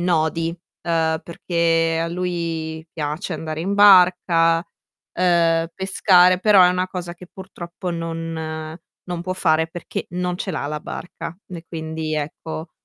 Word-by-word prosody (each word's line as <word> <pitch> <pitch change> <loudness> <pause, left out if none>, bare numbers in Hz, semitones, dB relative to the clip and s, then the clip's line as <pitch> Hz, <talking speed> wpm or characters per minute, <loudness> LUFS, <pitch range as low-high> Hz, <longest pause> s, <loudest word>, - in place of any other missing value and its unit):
nodi, 165 -1 +1 0.3
uhm, 160 -1 +1
perché 165 -1 0
a 165 - -2
lui 165 -3 -3
piace 155 +4 -3
andare 155 0 -5
in 195 +4 -1
barca, 180 -4 +6 0.6
uhm, 170 -2 +3
pescare 185 -1 +4
però 205 -2 +6
è 180 - +6
una 180 +1 0
cosa 175 -2 -5
che 180 0 -14
purtroppo 180 -1 -7
non 165 -1 -4 0.3
non 175 -1 -3
può 185 +1 -3
fare 160 -2 +2
perché 175 +1 -6
non 180 0 -2
ce 190 - -4
l'ha 155 -3 -3
la 150 0 -4
barca, 175 0 -7
e 175 -2 -8
quindi 160 -1 -4
ecco, 155 +2 -5
170 Hz, 140 wpm, -21 LUFS, 160-180 Hz, 0.6 s, barca